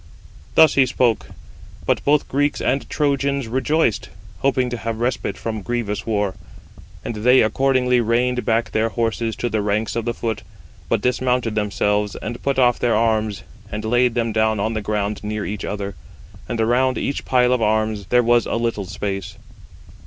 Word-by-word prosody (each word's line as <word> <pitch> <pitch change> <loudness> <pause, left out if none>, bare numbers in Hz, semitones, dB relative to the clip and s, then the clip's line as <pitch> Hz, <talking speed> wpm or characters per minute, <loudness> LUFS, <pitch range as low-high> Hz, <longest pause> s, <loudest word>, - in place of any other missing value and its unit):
Thus 160 -2 +7
he 135 -2 +4
spoke. 120 -3 +1 0.6
But - - +1
both 145 0 +2
Greeks 145 +2 0
and 135 +1 -1
Trojans 140 -3 0
rejoiced, 130 0 0 0.3
hoping 130 -2 +1
to 120 - -2
have 115 0 -4
respite 120 -5 -1
from 110 +2 -4
grievous 105 -3 -3
war. 105 -3 0 0.7
And 115 - -4
they 125 +4 +5
accordingly 125 +2 +2
reined 125 +2 +1
back 115 0 0
their 110 +1 +1
horses 115 -1 -1
to 120 - -2
the 110 -2 -1
ranks 105 +2 -1
[of 115 -1 -2
the 120 -1 -2
foot], 115 -2 -3 0.5
but 115 -3 +1
dismounted 125 -1 0
themselves, 105 -1 0
and 120 +2 -6
put 140 -1 -1
off 125 -2 +3
their 120 -2 +2
arms, 110 -2 0 0.3
and 105 +1 -4
laid 120 +1 +2
them 115 -2 0
down 110 -1 +1
on 110 +3 0
the 110 - -2
ground 105 0 -2
near 105 0 -3
each 105 +3 -4
other; 100 -1 -4 0.6
and 120 -2 -2
around 125 +3 +2
[each 140 - -2
pile 125 -1 +3
of 125 - 0
arms] 110 -2 0
there 125 +4 +3
was 120 0 +3
a - - -1
little 115 -4 -1
space. 95 0 -5
115 Hz, 175 wpm, -21 LUFS, 105-125 Hz, 0.7 s, Thus